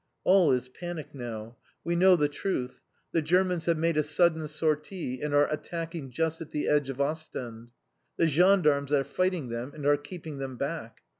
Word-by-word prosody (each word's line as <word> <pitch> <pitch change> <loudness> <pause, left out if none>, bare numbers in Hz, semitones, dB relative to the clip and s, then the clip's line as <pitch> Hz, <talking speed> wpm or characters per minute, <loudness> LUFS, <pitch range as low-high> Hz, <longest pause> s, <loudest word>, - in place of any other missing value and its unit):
All 185 -4 +5
is 125 -1 0
panic 170 +4 -7
now. 115 -3 -7 0.3
We 170 - -1
know 185 +1 +6
the 150 -4 +2
truth. 145 -4 -3 0.3
The 165 - +2
Germans 180 +1 +1
have 170 -1 +2
made 165 0 +1
a - - +5
sudden 160 +1 +2
sortie, 155 -2 -2
and 150 - -2
are 145 0 +5
attacking 165 -2 -5
just 160 +5 -1
at 160 - -7
the 150 -2 -2
edge 145 -2 +2
of 135 0 -5
Ostend. 130 -6 -3 0.5
The - - +3
gendarmes 155 -3 +3
are 140 -2 +3
fighting 185 -5 -1
them, 120 +4 -5
and 145 -2 -7
are 145 0 +5
keeping 155 -1 -8
them 135 -2 -5
back. 140 -4 -5
150 Hz, 180 wpm, -28 LUFS, 135-170 Hz, 0.5 s, know